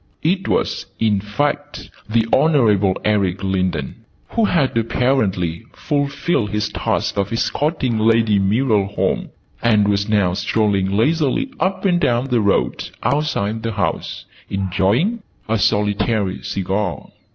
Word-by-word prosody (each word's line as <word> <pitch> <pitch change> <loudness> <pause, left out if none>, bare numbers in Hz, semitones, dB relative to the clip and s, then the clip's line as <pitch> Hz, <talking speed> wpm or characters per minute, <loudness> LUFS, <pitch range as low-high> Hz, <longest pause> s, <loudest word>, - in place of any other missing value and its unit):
It 185 +4 0
was, - - -1
in 105 -3 +2
fact, 145 +8 -3 0.2
the 115 0 +2
Honourable 105 -11 +3
Eric 100 -3 +1
Lindon, 90 -7 -1 0.3
who 230 -2 +1
had 165 - +1
apparently 110 -8 0
fulfilled 145 -4 -1
his 105 0 -1
task - - -2
of 100 +2 -1
escorting 130 0 0
Lady 110 -2 +3
Muriel 105 0 +2
home, 100 - -1 0.3
and 105 -3 +3
was 100 +1 0
now 100 -4 +2
strolling 100 -1 0
leisurely 155 - +1
up 190 +1 -1
and 175 -3 +3
down 125 -3 +1
the 120 -3 +2
road 100 -1 0
outside 115 -8 0
the 115 0 -3
house, 100 -3 -3 0.2
enjoying; 100 - 0 0.3
a 110 0 0
solitary 105 -1 0
cigar. 95 -4 -3
110 Hz, 125 wpm, -19 LUFS, 100-135 Hz, 0.3 s, Honourable